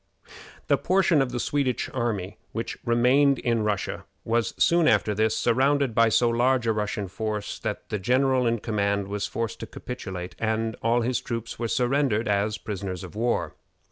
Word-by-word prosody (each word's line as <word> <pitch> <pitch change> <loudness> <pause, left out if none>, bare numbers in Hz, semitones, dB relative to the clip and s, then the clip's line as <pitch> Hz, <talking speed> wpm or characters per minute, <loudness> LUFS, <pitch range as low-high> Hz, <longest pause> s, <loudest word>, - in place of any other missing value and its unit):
The - - +2
portion 185 -5 +3
of 130 -2 -1
the 120 - -3
Swedish 135 -1 0
army 105 -6 -2
which 115 - -3
remained 130 +4 +4
in 115 -2 0
Russia 105 -2 -2 0.2
was 115 0 0
soon 170 -1 +4
after 105 - +3
this 110 +1 +1
surrounded 135 +2 +2
by 115 0 +4
so 120 +2 +3
large 120 +1 +2
a 115 - +2
Russian 105 -1 -2
force 105 +1 -4
that - - -4
the 105 - -2
general 130 +4 +2
in 115 -2 0
command 100 -2 0
was 100 0 -2
forced 115 -3 -4
to - - -6
capitulate, 95 -8 -7
and 110 0 -1
all 115 +2 +2
the 125 +2 0
troops 115 -1 -4
were 115 - -1
surrendered 125 -2 +1
as 105 +1 +1
prisoners 100 -3 -5
of 95 +1 -10
war. 120 +2 0
115 Hz, 175 wpm, -26 LUFS, 105-125 Hz, 0.2 s, remained